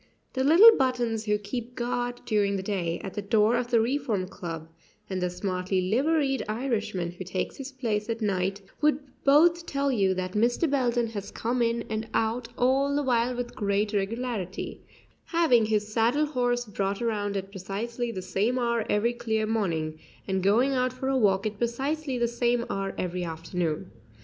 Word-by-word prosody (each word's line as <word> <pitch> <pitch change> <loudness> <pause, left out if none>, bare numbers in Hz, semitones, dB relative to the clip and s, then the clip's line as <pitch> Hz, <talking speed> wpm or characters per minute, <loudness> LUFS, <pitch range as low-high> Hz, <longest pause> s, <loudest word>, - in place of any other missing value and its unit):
The 260 - 0
little 380 +11 +9
"buttons" 240 -4 0
who 210 -1 +2
keeps 235 +4 -6
guard 245 0 -2
during 205 -2 +1
the 190 - -3
day 180 -4 -2
at 190 - -5
the 205 - -3
door 215 +2 +3
of 240 0 -1
the 235 -2 +4
Reform 230 -5 0
Club 165 -4 -6 0.4
and 190 -1 -3
the 180 - +1
smartly 185 +1 -1
liveried 270 - +1
Irishman 215 -7 -2
who 180 +2 -8
takes 185 0 -3
his 275 0 -6
place 230 -5 -2
at 230 0 -1
night 195 -1 -1 0.2
would 300 -2 +4 0.3
both 335 +4 +5
tell 280 0 0
you 195 -6 +2
that 185 0 -3
Mr. 235 - +2
Belden 245 -4 +1
has 205 -3 -5
come 240 +2 -2
in 235 0 +1
and 220 0 -3
out 230 +2 0
all 270 +3 +2
the 290 - +1
while 245 -1 +1
with 245 0 -4
great 205 +1 0
regularity, 205 -1 -3 0.4
having 305 -10 +3
his 210 -1 0
saddle 240 +7 +3
horse 245 -4 0
brought 200 -2 -2
around 205 -3 -1
at 195 0 -5
precisely 225 +5 -4
the 185 -4 -5
same 215 +7 0
hour 235 -2 +1
every 225 +3 +2
clear 220 -2 -1
morning, 165 -8 -1 0.3
and 190 -1 0
going 225 +8 +3
out 255 -1 +1
for 260 +1 -3
a 270 - +1
walk 200 -5 +3
at 210 -1 -3
precisely 270 +4 -1
the 240 0 +2
same 240 0 0
hour 195 0 -3
every 180 0 -2
afternoon. 165 - -3
225 Hz, 180 wpm, -27 LUFS, 195-250 Hz, 0.4 s, little